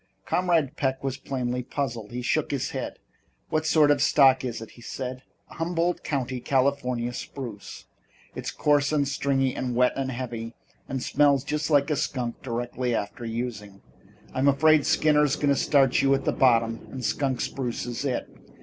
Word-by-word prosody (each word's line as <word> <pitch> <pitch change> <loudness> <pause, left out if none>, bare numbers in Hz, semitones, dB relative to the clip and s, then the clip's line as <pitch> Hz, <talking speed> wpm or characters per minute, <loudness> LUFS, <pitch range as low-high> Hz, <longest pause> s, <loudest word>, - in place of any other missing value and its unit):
Comrade 165 -6 +1
Peck 135 -2 -1
was 135 -1 -2
plainly 125 -2 -3
puzzled. 120 -4 -4
He 125 +1 -4
shook - - 0
his - - -2
head. - - -5 0.5
"What 155 0 0
sort 150 -2 +5
of 145 - +2
stock 135 -3 +5
is 120 -3 -3
it?" 115 - -9
he 120 - -16
asked. 130 +1 -5 0.3
"Humboldt 170 +1 -1
County, 130 -3 -2
California, 125 -2 0
spruce, 120 -5 -7 0.5
and - - -8
it's - - -4
coarse 145 -1 +2
and 145 -2 +1
stringy 135 -1 0
and 125 -2 -2
wet 125 +1 +3
and 135 -1 -2
heavy 120 -2 -5 0.3
and 130 -2 -3
smells 140 -2 +3
just 150 +2 -2
like 145 0 +3
a - - +2
skunk 125 -4 -3
directly 120 0 -2
after 105 +3 -4
using. 110 -4 -5 0.5
I'm 130 +2 +1
afraid 150 +2 +4
Skinner's 150 -2 +3
going 145 - 0
to 140 - +4
start 135 -2 +3
you 135 0 +4
at 135 - -4
the - - +2
bottom 115 -3 +2
and 130 -2 -6
skunk 135 -1 0
spruce 125 -4 -3
is 120 +2 -4
it. 130 -4 -2
130 Hz, 175 wpm, -26 LUFS, 120-145 Hz, 0.5 s, sort